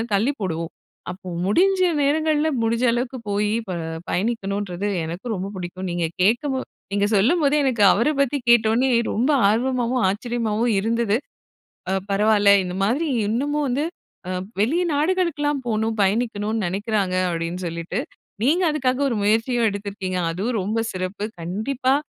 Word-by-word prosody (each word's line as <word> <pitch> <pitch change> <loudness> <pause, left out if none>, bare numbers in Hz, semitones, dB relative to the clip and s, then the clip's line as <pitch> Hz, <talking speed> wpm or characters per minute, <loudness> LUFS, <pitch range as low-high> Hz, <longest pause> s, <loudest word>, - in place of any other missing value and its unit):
தள்ளி 225 +8 +2
போடுவோம். 165 -3 -3 0.4
அப்போ 185 0 -9 0.2
முடிஞ்ச 375 - +3 0.2
நேரங்கள்ல 310 +2 +2
முடிஞ்ச 230 +2 0
அளவுக்கு 245 +2 -2
போய் 205 +1 +1 0.2
ப - - -2 0.4
பயணிக்கணுன்றது 200 -2 -2 0.2
எனக்கும் 175 +9 -4
ரொம்ப 190 +1 -4
புடிக்கும். 185 +1 -5
நீங்க 175 -1 -1 0.2
கேட்க 225 +8 +3
போ 260 - -1 0.3
நீங்க 200 0 +1
சொல்லும்போதே 290 - +3
எனக்கு 240 -6 +2
அவர 235 +8 +2
பத்தி 280 +1 +2
கேட்ட 235 -2 +6
உடனே 255 +4 +2 0.2
ரொம்ப 255 +7 +2 0.2
ஆர்வமாவும், 250 +1 +1
ஆச்சரியமாவும் 230 +1 -1
இருந்தது. 225 0 +1 0.7
அ - - +1 0.2
பரவால்ல 205 0 +4
இந்த 180 0 -5
மாதிரி 275 +11 +1 0.2
இன்னமும் 290 +7 0
வந்து 270 +5 0 0.4
அ - - -2 0.3
வெளி 285 +11 +2
நாடுகளுக்கெல்லாம் 295 -3 0
போணும் 220 0 0
பயணிக்கணும்னு 215 +1 0
நெனக்கிறாங்க, 195 0 -1
அப்படீன்னு 170 +2 -3
சொல்லிட்டு. 170 +5 -4 0.4
நீங்க 325 +9 +3
அதுக்காக 265 -3 0
ஒரு 235 - -1
முயற்சியும் 225 +3 +2
எடுத்திருக்கீங்க, 200 -2 -4
அதுவும் 210 +6 -2
ரொம்ப 215 +4 -1
சிறப்பு! 185 +3 -3 0.2
கண்டிப்பா 255 +10 0
225 Hz, 135 wpm, -22 LUFS, 195-260 Hz, 0.7 s, கேட்ட